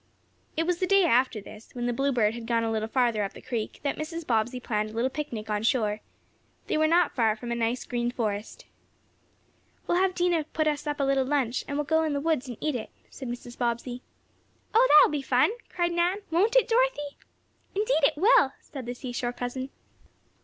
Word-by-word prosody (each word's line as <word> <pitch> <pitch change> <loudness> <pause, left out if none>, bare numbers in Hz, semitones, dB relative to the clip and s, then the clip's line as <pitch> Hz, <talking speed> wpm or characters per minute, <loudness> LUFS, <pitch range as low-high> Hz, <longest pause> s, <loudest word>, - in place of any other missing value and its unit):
It 325 - +1
was 355 0 0
the 370 - 0
day 395 0 +5
after 255 -6 +2
this, 215 +2 -13
when 240 -1 -3
the 245 - 0
Bluebird 240 -4 +1
had 230 -1 -7
gone 230 -1 +1
a 225 - -1
little 220 0 -1
farther 235 -3 +1
up 195 - -4
the - - -11
creek, 230 -4 -4
that 280 - -1
Mrs. 325 +2 -5
Bobbsey 240 +1 0
planned 215 -3 -2
a - - -11
little 240 +4 0
picnic 245 -7 -5
on 210 0 0
shore. 215 -3 +1 0.7
They - - -1
were 310 0 +3
not 340 0 +3
far 225 -4 +2
from 235 +2 -7
a - - 0
nice, 235 +1 -1
green 240 -1 -1
forest. 225 - -4 1.2
"We'll 350 - +2
have 380 -1 +1
Dinah 350 -3 +1
put 310 - +1
us 300 0 -1
up 295 0 -2
a - - +2
little 275 -1 +2
lunch, 260 -3 0
and 285 - -3
we'll 295 - 0
go 320 +2 +2
in 315 -2 0
the 285 - 0
woods 300 -3 0
and 240 -3 -7
eat 305 - -1
it," 225 - -4 0.2
said 265 - -8
Mrs. 240 0 -7
Bobbsey. 240 +1 -2 0.7
"Oh, 480 +3 +6
that 300 - +9
will - - -1
be 295 -2 -1
fun!" 260 +6 +3 0.2
cried 345 -1 0
Nan. 350 +4 0
"Won't 405 +9 +2
it, - - +5
Dorothy?" 460 -12 +1 0.6
"Indeed 420 -3 +1
it 280 - +3
will," 410 - +5
said 265 -5 -9
the 245 - -4
seashore 245 -1 -4
cousin. 250 +2 -4
265 Hz, 215 wpm, -27 LUFS, 235-320 Hz, 1.2 s, that